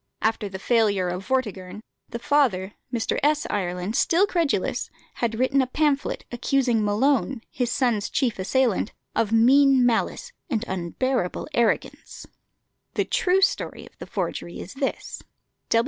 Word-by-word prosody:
After 220 -2 0
the 190 - -6
failure 200 -4 +2
of 180 +2 -5
"Vortigern," 210 -6 -2 0.3
the - - -4
father, 235 -8 +1 0.2
Mr. 235 -3 -1
S. 300 +1 +2
Ireland, 180 +1 -2
still 345 +9 +3
credulous, 340 -7 -1 0.3
had 230 -2 0
written 260 +2 +2
a 260 - 0
pamphlet, 290 +1 0
accusing 245 -2 +1
Malone, 255 +4 +1
his 245 -2 -1
son's 235 -6 0
chief 245 -7 0
assailant, 225 +1 +1 0.2
of 220 -2 +1
mean 260 +3 +5
malice 245 - 0 0.2
and 235 -4 -1
unbearable 190 +4 -2
arrogance. 235 -3 -1 0.7
The - - +1
true 385 -6 +2
story 390 - 0
of - - -18
the - - -8
forgery - - -4
is - - -8
this. - - -4
235 Hz, 135 wpm, -24 LUFS, 205-275 Hz, 0.7 s, mean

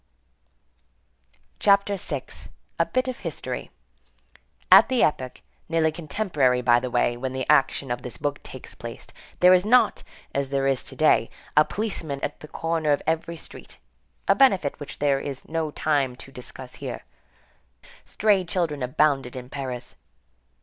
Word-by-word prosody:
CHAPTER 200 0 +4
VI—A 195 - -5
BIT 255 0 0
OF 255 - -4
HISTORY - - -5 1.0
At - - +9
the 255 -2 +3
epoch, 130 -4 -1 0.3
nearly 160 -1 +2
contemporary 150 -6 0
by 120 -1 +5
the 125 +1 -4
way, 120 0 +1
when 130 +2 -4
the 130 -1 -2
action 135 -1 +3
of 120 0 -2
this 125 -2 -7
book 145 -1 -3
takes - - -10
place, - - -8 0.4
there 180 0 +8
was 180 -1 +6
not, 245 +4 +4 0.3
as 140 -1 -1
there 135 0 0
is 135 -2 +1
to - - -9
day, 155 -7 +3 0.3
a 150 - +7
policeman 165 -9 -3
at 145 - -3
the 150 - -10
corner 165 -1 -1
of 145 - -2
every 165 +1 -1
street 160 - -12 0.5
(a - - +6
benefit 195 - +3
which 145 - -8
there 140 -1 +2
is 140 -1 -6
no 160 -1 -2
time 145 -4 0
to 135 - -13
discuss 125 0 -9
here); - - -5 1.0
stray 205 -3 +2
children 170 -5 -2
abounded 135 0 +1
in 125 -1 -8
Paris. 130 -3 -5
145 Hz, 150 wpm, -25 LUFS, 130-170 Hz, 1.0 s, At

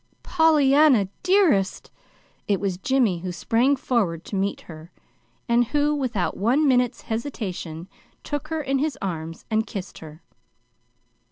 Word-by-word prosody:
"Pollyanna, 295 - +4
dearest!" 360 - +2 0.6
It 200 -2 +1
was 190 -3 -2
Jimmy 235 -6 +1
who 180 +1 -5
sprang 235 +10 +1
forward 205 -11 -1
to - - -6
meet 195 +1 -1
her, 160 +1 -12 0.6
and 240 0 +3
who, 295 +4 +1
without 245 -10 -2
one 255 +9 +2
minute's 250 -2 +2
hesitation, 190 - -5 0.4
took 290 0 -4
her 320 -1 -3
in 270 0 0
his 300 +1 -1
arms 165 -3 -5
and 220 +1 +1
kissed 195 -4 -7
her. 160 +1 -12
235 Hz, 135 wpm, -23 LUFS, 185-285 Hz, 0.6 s, Pollyanna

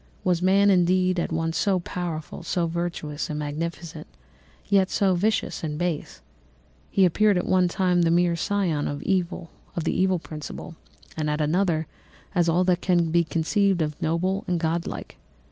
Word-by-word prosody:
Was 180 -2 +1
man, 200 +2 +4
indeed, 185 0 +3
at 170 - -2
once 165 0 -1
so 195 -3 +2
powerful, 170 -3 -5
so 175 0 -1
virtuous 165 -3 -3
and 150 - -3
magnificent, 155 +2 -5 0.6
yet 195 -2 +3
so 195 -2 +2
vicious 205 +2 0
and 150 -2 -3
base? 175 -2 -3 0.7
He 195 - +4
appeared 205 +3 +3
at 180 - -1
one 185 -1 +3
time 180 0 +1
a 165 - +3
mere 175 0 +3
scion 170 -4 0
of 145 0 -4
the - - -1 0.9
evil 190 -1 +3
principle 155 +1 -8 0.4
and 155 -1 -1
at 150 +1 -1
another 160 +1 +1 0.5
as 175 -3 +2
all 175 +2 +3
that 180 -1 +1
can 175 -3 +2
be 170 +1 +4
conceived 175 +3 +1
of 150 -1 -5
noble 185 +5 0
and 175 -1 0
godlike. 165 +1 -3
175 Hz, 160 wpm, -25 LUFS, 160-185 Hz, 0.9 s, man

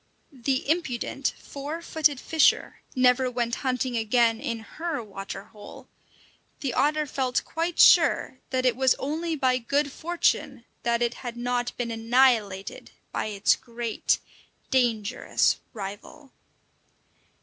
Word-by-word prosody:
The 265 0 -2
impudent, 275 -4 -1
four 290 +4 -6
footed 300 -5 +1
fisher 320 +2 +2
never 255 0 +4
went 240 -1 -2
hunting 255 -1 -1
again 225 0 +2
in 230 -1 -3 0.2
her 325 -7 -2
water 195 -1 -7
hole. 210 0 -13 0.7
The 265 -4 -2
otter 300 +3 +2
felt 260 -2 -1
quite 330 +1 -3
sure 260 - +5
that 260 -1 0
it 250 -2 +3
was 260 0 +3
only 320 +4 -2
by 255 -3 +2
good 280 +4 0
fortune 290 -6 -1 0.2
that 235 0 +1
it 240 0 0
had 240 -2 -6
not 245 0 -2
been 235 -1 -2
annihilated 225 -4 +1 0.2
by - - -2
its 205 -2 +2
great, 235 -2 -1 0.5
dangerous 240 -3 +1
rival. 210 +7 -8
250 Hz, 125 wpm, -26 LUFS, 230-280 Hz, 0.7 s, sure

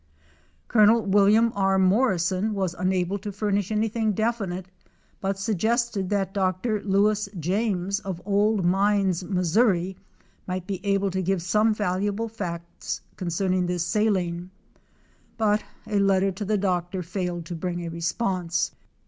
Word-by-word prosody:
Col. 220 0 +5
Wm. 205 +3 +4
R. 195 -1 +2
Morrison 190 0 +2
was 190 -3 -1
unable 185 +1 0
to 205 +1 -5
furnish 205 -1 -1
anything 220 0 0
definite, 200 -4 -1 0.5
but 195 0 -2
suggested 220 0 0
that 195 -2 0
Dr. 195 +3 0
Lewis 205 +1 +2
James, 195 +2 0
of 190 -4 -5
Old 205 -1 +2
Mines, 195 -1 +2
Mo., 185 0 -1 1.0
might 185 -1 -3
be 195 -1 -5
able 200 -1 +1
to 190 +1 -1
give 185 -1 0
some 215 +4 +3
valuable 205 +2 -1
facts 170 -6 -5
concerning 180 +1 0
this 175 -2 -1
saline, 185 -5 0 0.9
but 215 -1 +2 0.2
a 210 -1 0
letter 195 0 +3
to 190 +3 -5
the 210 +1 +1
doctor 180 -1 -1
failed 175 -1 -3
to 175 - -6
bring 175 +1 -3
a - - -4
response. 175 +1 -1
195 Hz, 130 wpm, -25 LUFS, 180-210 Hz, 1.0 s, Col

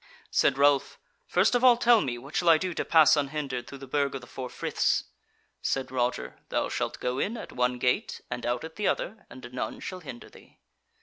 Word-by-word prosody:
Said - - +3
Ralph: 140 -1 +3 0.3
"First - - +3
of 245 0 +2
all, 245 -2 +7
tell 240 -2 +5
me 125 -4 -2
what 135 +5 -11
shall 175 - +3
I 165 - +8
do 185 +2 -3
to - - -2
pass 160 -2 +6
unhindered 140 -4 -2
through 140 - -9
the 135 - -9
Burg 140 +1 0
of 135 - -5
the - - -11
Four 130 -1 -7
Friths?" - - 0 0.6
Said 135 -1 -1
Roger: 125 -1 -2
"Thou - - 0
shalt - - -3
go 125 +1 -2
in 230 +4 -1
at - - -8
one 125 0 0
gate 125 0 0
and 125 0 -4
out 120 0 -1
at 160 0 -9
the 210 - 0
other, 215 +2 -2
and 125 -1 -11
none 125 - -4
shall 185 - -6
hinder 130 -8 -9
thee." - - -18
140 Hz, 220 wpm, -28 LUFS, 125-165 Hz, 0.6 s, I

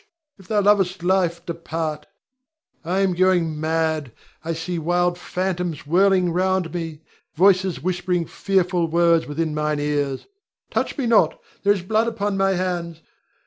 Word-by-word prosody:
If 190 - -16
thou 210 -2 +2
lovest 195 -3 +2
life, 175 -2 +1
depart. 160 -2 -4 0.8
I'm 185 +2 +1
going 175 -4 +2
mad: 160 -4 0 0.3
I 165 +1 -2
see 165 +2 -4
wild 175 +2 +1
phantoms 180 -4 -3
whirling 180 +2 +3
round 185 -1 0
me, 165 -3 -5 0.3
voices 185 0 +3
whispering 180 -1 -1
fearful 180 -2 0
words 170 0 +3
within 155 +1 -2
mine 150 0 -1
ears. 145 -2 -1 0.5
Touch - - -1
me 270 - -1
not, 230 -2 +3 0.2
there 205 0 +4
is 190 -4 -5
blood 220 +4 +1
upon 205 -3 -2
my 195 0 +2
hands! 175 -3 -3
175 Hz, 140 wpm, -22 LUFS, 165-190 Hz, 0.8 s, there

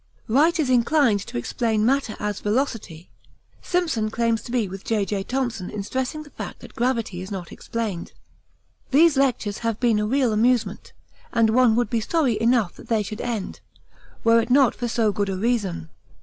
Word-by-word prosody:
Wright 305 +9 +3
is 275 -5 +1
inclined 245 -2 +3
to - - -5
explain 220 - 0
matter 265 -3 +1
as 210 -2 -2
velocity; 210 - -2 0.5
Simpson 320 -12 0
claims 230 0 0
to - - -9
be 240 -4 +1
with 190 +1 -8
J.J. 205 -2 -1
Thomson 240 -7 -2
in 210 -2 -5
stressing 260 +7 -3
the 290 - -16
fact - - -8
that - - -12
gravity 230 -7 -1
is 190 - -7
not 190 -4 -6
explained. 220 -7 -4 0.8
These 310 +3 +5
lectures 250 -6 0
have 230 -2 -2
been 235 -4 +2
a 210 - 0
real 255 -1 +2
amusement 235 +2 +1 0.4
and 230 -2 +3
one 240 -1 +4
would 240 +1 0
be 230 -2 +1
sorry 270 -3 0
enough 230 -5 +2
that - - -13
they 220 -2 +1
should 210 +2 -6
end, 230 -5 -4 0.6
were 230 0 +5
it 230 - -5
not 265 -1 +5
for 240 - -4
so 225 -2 +1
good 205 0 -1
a 190 - -2
reason. 200 -7 -1
230 Hz, 180 wpm, -23 LUFS, 210-255 Hz, 0.8 s, These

